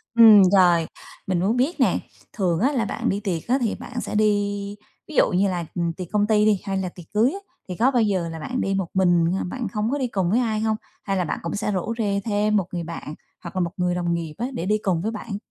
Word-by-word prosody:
Ừm, 220 -3 +9
rồi. 175 -4 +5 0.4
Mình 185 -2 +1
muốn 205 +7 +1
biết 285 +7 0
nè, 235 -9 +3 0.3
thường 180 -5 0
á 260 +6 +2
là 245 -6 0
bạn 200 - -2
đi 200 - 0
tiệc 185 -6 -3
á 250 +3 +3
thì 230 - 0
bạn 245 -1 -6
sẽ - - -5
đi 205 -1 0 0.3
ví 310 - -9
dụ - - +4
như 195 +2 +2
là, 175 -3 -2
ừm, 170 -2 -1
tiệc 180 +1 -7
công 210 0 +2
ty 210 -1 +3
đi 210 -3 +3
hay 195 -2 -2
là 190 -1 -2
tiệc 175 -1 -13
cưới 225 +6 +3
á, 395 - -6 0.3
thì 180 - -4
có 240 +8 +3
bao 245 -3 +2
giờ 190 -6 0
là 165 0 -7
bạn 250 +11 -3
đi 195 - 0
một 190 -3 -1
mình 175 -3 +3
hay 170 - +1
là - - -2
bạn 250 -3 -3
không 210 +2 -1
có 285 - 0
đi 260 -3 -1
cùng 190 -6 -1
với 235 - +3
ai 220 -3 0
hông? 220 0 +1 0.3
Hay 195 -1 -1
là 180 - +1
bạn - - -3
cũng 170 - -3
sẽ 210 0 -1
rủ 195 +3 -2
rê 200 -3 0
thêm 210 -1 +1
một 195 -4 +1
người 175 -1 -2
bạn 160 -2 -7 0.3
hoặc - - -8
là 185 - 0
một 170 -1 -1
người 180 -1 0
đồng 175 -1 -1
nghiệp 165 -2 -3
á, 240 - -2
để 185 -7 -3
đi 210 +2 +2
cùng 180 -4 +1
với 215 +5 -2
bạn? 210 -2 -5
200 Hz, 280 wpm, -23 LUFS, 180-220 Hz, 0.4 s, Ừm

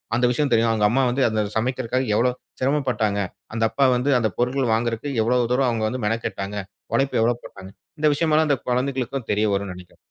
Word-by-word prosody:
அந்த 125 +1 +2
விஷயம் 140 +2 0
தெரியும். 115 0 +3
அவங்க 105 -2 +2
அம்மா 130 +5 +2
வந்து 130 +3 -1
அதச் 110 -2 -1
சமைக்கிறதுக்காக 130 +2 -1
எவ்வளவு 125 +3 +1 0.2
சிரமம் 135 +1 0
பட்டாங்க, 105 -4 0 0.3
அந்தப்பா 115 +4 +1
வந்து 125 +4 0
அந்தப் 110 -5 -2
பொருட்கள் 125 -1 0
வாங்குறதுக்கு 115 +4 -1
எவ்வளவு 120 0 +1
தூரம் 130 0 +2
அவங்க 110 -2 -1
வந்து 125 +1 -4
மெனக்கெட்டாங்க, 105 -2 -3 0.4
உழைப்பு 135 -3 +1
எவ்வளவு 120 +1 +1
போட்டாங்க 95 0 -11 0.3
இந்த 155 - +3
விஷயம்ல்லாம் 155 +1 +2
அந்தக் 140 -3 -1
குழந்தைகளுக்குத் 130 0 -1
தெரியவரும்ன்னு 100 -2 0
நினைக்கிறேன். 90 -1 -14
120 Hz, 180 wpm, -23 LUFS, 110-130 Hz, 0.4 s, தெரியும்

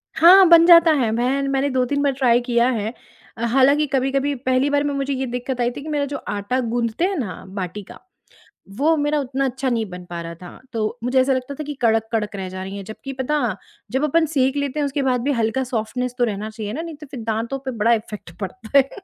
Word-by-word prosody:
हाँ, 370 +4 +8
बन 335 -1 +8
जाता 335 -1 +8
है 255 -8 +1
बहन, 265 +4 0
मैंने 275 +1 +1
2-3 260 +2 0
बार 280 - +3
ट्राई 250 -3 +3
किया 240 0 +2
है। 225 -2 -2 0.4
अ, 230 - -5
हालाँकि 270 +5 +4
कभी-कभी 270 +1 0
पहली 260 +2 +1
बार 285 0 +1
में 290 -1 -1
मुझे 275 0 -2
ये 265 0 -2
दिक्कत 250 +1 -3
आई 240 - +1
थी 280 - -8
कि 310 - -7
मेरा 290 -2 0
जो 280 0 -4
आटा 205 +5 -2
गूँथते 235 +5 -1
हैं 390 - -1
ना 190 -9 -5
बाटी 190 +1 -5
का, - - -13 0.7
वो 285 +11 +1
मेरा 295 0 +1
उतना 270 0 -2
अच्छा 265 +1 -2
नहीं 230 -3 0
बन 180 0 -9
पा 170 -1 -5
रहा 170 0 -7
था, 180 - -11
तो 220 +1 -2
मुझे 250 +2 +2
ऐसा 265 +1 +2
लगता 255 +2 -3
था - - -2
कि 295 0 -5
कड़क-कड़क 220 -2 0
रह 190 -1 -5
जा 185 0 -6
रही 190 +1 -7
हैं, 200 - -6
जबकि 270 +6 -8
पता, 270 +3 -1 0.4
जब 265 +2 0
अपन 320 +2 +3
सेंक 275 -3 +1
लेते 285 +1 -2
हैं, 290 - +1
उसके 280 +1 -2
बाद 250 -2 +1
भी 285 +4 0
हल्का 225 +4 0
सॉफ्टनेस 250 +1 -3
तो 245 - +2
रहना 215 -1 -2
चाहिए 215 -1 -6
ना, 315 - -3
नहीं 330 -2 -7
तो 300 +1 -11
फिर 260 - -6
दाँतों 230 +4 -2
पे 260 - -2
बड़ा 230 0 +2
इफ़ेक्ट 210 -5 -5
पड़ता 220 +6 -2
है। 270 0 +4
255 Hz, 240 wpm, -21 LUFS, 225-280 Hz, 0.7 s, हाँ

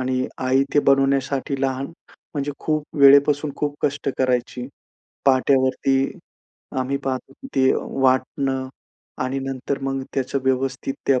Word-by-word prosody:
आणि 130 0 0 0.2
आई 130 +1 +3
ते - - +5
बनवण्यासाठी 135 0 +2
लहान 135 0 -1 0.5
म्हणजे 145 0 -2
खूप 155 -1 -1
वेळेपासून 140 +1 +6
खूप 145 -1 -2
कष्ट 145 -1 -1
करायची. 125 -1 0 0.6
पाट्यावरती 135 0 +3 0.8
आम्ही 130 +2 -1
पाहतो 130 0 -3
की 265 - -12
ती 130 0 +4
वाटणं 130 0 0 0.5
आणि 130 +1 -2
नंतर 135 +1 -3
मग 135 0 -2
त्याचं 135 0 -1
व्यवस्थित 130 +1 0
त्या 135 - +4
अ, - - 0
135 Hz, 130 wpm, -22 LUFS, 130-140 Hz, 0.8 s, वेळेपासून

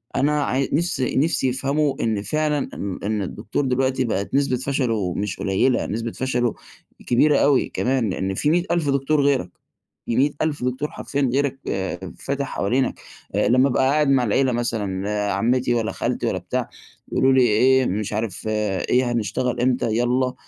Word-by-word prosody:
أنا 150 +1 +2
عاي 135 0 0
نِفسي 165 -4 0
نِفسي 140 -2 +2
يفهموا 140 +3 0
إن 110 -3 0
فعلًا 150 +3 -1
إن 100 -2 -5
إن 105 0 -1
الدكتور 105 +7 -3
دلوقتي 130 0 +1
بقِت 100 -1 -2
نسبة 140 -3 +2
فشلُه 120 -9 -1
مش 100 -1 -3
قليِّلة، 95 +6 +1
نسبة 115 +2 -3
فشلُه 125 -3 -1 0.5
كبيرة 140 +4 +4
أوي 140 -2 +3
كمان، 125 -4 0
لأن 95 +1 -2
في 145 - 0
مِيّة 175 +2 +3
ألف 165 -5 +1
دكتور 140 +2 +2
غيرك. 135 -10 +1 0.6
في 115 - -1
مِيّة 145 +3 +3
ألف 155 -4 -1
دكتور 130 +4 -2
حرفيًا 140 -2 -2
غيرك 135 -1 0 0.6
فاتح 140 0 -2
حوالينك، 125 +7 -1 0.4
أ - - +2
لمّا 130 +3 +4
أبقى 130 - +1
قاعد 150 0 +2
مع 135 -2 +4
العيلة 125 +4 +2
مثلًا، 105 -5 -2 0.2
عمِّتي 120 +4 +1
والّا 115 -2 0
خالتي - - -2
والّا - - -1
بتاع، - - -3 0.4
يقولوا 135 0 +3
لي: 130 - +5
"إيه، 125 +3 +4
مش 105 +2 -2
عارف 110 -2 -3
إيه، 110 +4 0
هنشتغل 120 +2 -1
إمتى؟ 125 -1 +1
يالّا، 125 +2 +1
130 Hz, 165 wpm, -22 LUFS, 115-140 Hz, 0.6 s, لي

